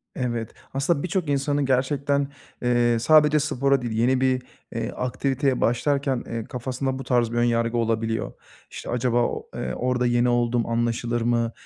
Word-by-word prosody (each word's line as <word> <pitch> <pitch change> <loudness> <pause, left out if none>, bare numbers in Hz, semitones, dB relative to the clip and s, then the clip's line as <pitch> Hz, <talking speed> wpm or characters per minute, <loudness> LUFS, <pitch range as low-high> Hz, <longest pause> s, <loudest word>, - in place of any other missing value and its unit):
Evet. 120 -3 -3 0.2
Aslında 140 +2 0
birçok 180 -3 -1
insanı 145 0 +1
gerçekten, 140 +2 +1 0.3
eee, 120 -1 +2
sadece 150 +4 +5
spora 140 -2 +1
değil, 120 -2 -3
yeni 125 +4 +2
bir, 130 -1 +2 0.3
eee, 115 +1 -2
aktiviteye 130 +1 -1
başlarken, 135 +2 +1
eee, 115 -1 -4
kafasında 130 +3 -3
bu - - -5
tarz 120 -2 +1
bir 120 - -2
ön 120 - +3
yargı 115 0 +1
olabiliyor. 115 -1 -1 0.4
İşte, - - -8
"Acaba, 120 0 0
o - - -3
eee, 65 - -3
orada 125 0 0
yeni 120 0 +3
olduğum 120 -1 +1
anlaşılır 120 0 -1
mı?" 115 0 +1
125 Hz, 160 wpm, -24 LUFS, 120-135 Hz, 0.4 s, sadece